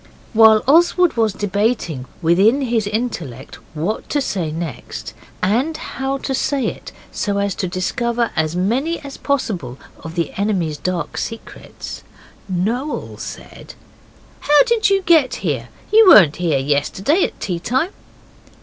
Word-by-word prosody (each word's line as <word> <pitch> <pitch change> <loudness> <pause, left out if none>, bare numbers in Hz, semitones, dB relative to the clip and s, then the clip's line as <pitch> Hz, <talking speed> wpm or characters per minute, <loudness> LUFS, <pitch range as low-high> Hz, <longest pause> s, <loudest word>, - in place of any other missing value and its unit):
While 220 -1 +6
Oswald 345 +4 +4
was 225 -2 +2
debating 200 - -1 0.2
within 195 - +4
his 230 -5 0
intellect 170 - -4 0.2
what 175 +9 -3
to 295 - +1
say 185 - -2
next, 160 -4 -6 0.3
and 250 +12 +1
how 270 -3 -3
to 270 - -4
say 275 0 0
it - - -5 0.2
so 205 -2 -2
as 200 -1 0
to 185 - -3
discover 235 +6 -1
as 160 0 0
many 250 - 0
as 280 -1 -9
possible 190 - -2 0.2
of 160 +1 -9
the 170 -1 -2
enemy's 185 -7 -1
dark 175 -4 -3
secrets, 225 0 -7 0.5
Noel 225 +11 -2
said - - -9 0.6
'How 295 0 +5
did 470 -4 +2
you 390 -1 +2
get 315 -8 +4
here? 130 -7 -2 0.2
You 440 -1 +7
weren't 170 - +7
here 170 -5 +1
yesterday 150 - +1
at - - -3
tea 180 -4 -3
time. 260 - 0
215 Hz, 140 wpm, -19 LUFS, 170-270 Hz, 0.6 s, You